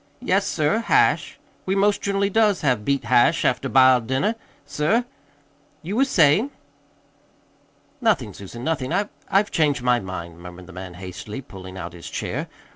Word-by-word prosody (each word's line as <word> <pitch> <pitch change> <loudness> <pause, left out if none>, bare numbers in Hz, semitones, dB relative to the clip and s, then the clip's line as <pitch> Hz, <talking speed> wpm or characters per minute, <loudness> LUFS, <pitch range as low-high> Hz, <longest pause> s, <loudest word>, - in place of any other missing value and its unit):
"Yes, 195 +2 +1
sir, 155 +7 +1
hash. 230 - +2 0.3
We 190 - +1
most 200 +1 +2
generally 200 0 0
does 210 -3 +3
have 125 -7 +1
beet 140 +3 0
hash 120 +1 +3
after - - +1
b'iled 130 -3 +5
dinner, 135 - +1 0.3
sir. 220 +12 0 0.8
You 190 +6 -4
was 270 +1 +3
sayin'?" 170 - +4 1.5
"Nothing, 180 - +1
Susan, 100 +6 -9
nothing. 145 -3 -2
I 200 +4 0 0.2
I've 205 +2 +2
changed 145 -5 +1
my 125 -1 +3
mind," 85 -4 -7
murmured 90 +1 -11
the 95 - -13
man 90 0 -8
hastily, 95 +5 -7
pulling 95 -5 -11
out 85 -2 -6
his 85 -1 -9
chair. - - -4
135 Hz, 155 wpm, -23 LUFS, -, 1.5 s, b'iled